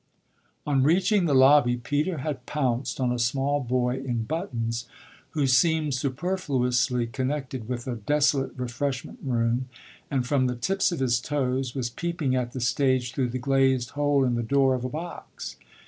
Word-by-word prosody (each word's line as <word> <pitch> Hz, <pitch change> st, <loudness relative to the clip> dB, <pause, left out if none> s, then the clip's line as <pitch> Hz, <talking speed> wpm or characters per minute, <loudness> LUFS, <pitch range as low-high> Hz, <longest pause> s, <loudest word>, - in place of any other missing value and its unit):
On 140 Hz, -3 st, +2 dB
reaching 180 Hz, +6 st, +3 dB
the 145 Hz, -4 st, +2 dB
lobby 130 Hz, -2 st, +6 dB
Peter 150 Hz, +8 st, -1 dB
had 135 Hz, -5 st, -4 dB
pounced 130 Hz, -4 st, -1 dB
on 125 Hz, -2 st, +1 dB
a 125 Hz, -, -1 dB
small 135 Hz, +4 st, +1 dB
boy 125 Hz, -1 st, 0 dB
in 125 Hz, -4 st, -2 dB
buttons, 120 Hz, -, -3 dB, 0.5 s
who 145 Hz, -, +3 dB
seemed 150 Hz, +3 st, +3 dB
superfluously 130 Hz, -4 st, 0 dB
connected 130 Hz, -1 st, -3 dB
with 120 Hz, -1 st, -3 dB
a 125 Hz, -2 st, -3 dB
desolate 145 Hz, +4 st, +1 dB
refreshment 125 Hz, +1 st, -3 dB
room 120 Hz, 0 st, 0 dB, 0.4 s
and, 130 Hz, -3 st, 0 dB
from 130 Hz, -1 st, +2 dB
the 125 Hz, -, -2 dB
tips 190 Hz, +11 st, +1 dB
of 170 Hz, -, -3 dB
his 120 Hz, -2 st, +2 dB
toes, 130 Hz, -2 st, -1 dB
was 120 Hz, -3 st, -2 dB
peeping 170 Hz, -4 st, -1 dB
at 125 Hz, -1 st, -2 dB
the 130 Hz, -, -4 dB
stage 125 Hz, +1 st, +1 dB
through 130 Hz, -3 st, 0 dB
the 125 Hz, -, -3 dB
glazed 130 Hz, -1 st, +2 dB
hole 145 Hz, -2 st, +2 dB
in 125 Hz, -, +1 dB
the 120 Hz, -, 0 dB
door 135 Hz, +2 st, +3 dB
of 125 Hz, -1 st, -2 dB
a 130 Hz, -, -2 dB
box. 165 Hz, +5 st, -7 dB
130 Hz, 165 wpm, -26 LUFS, 125-145 Hz, 0.5 s, lobby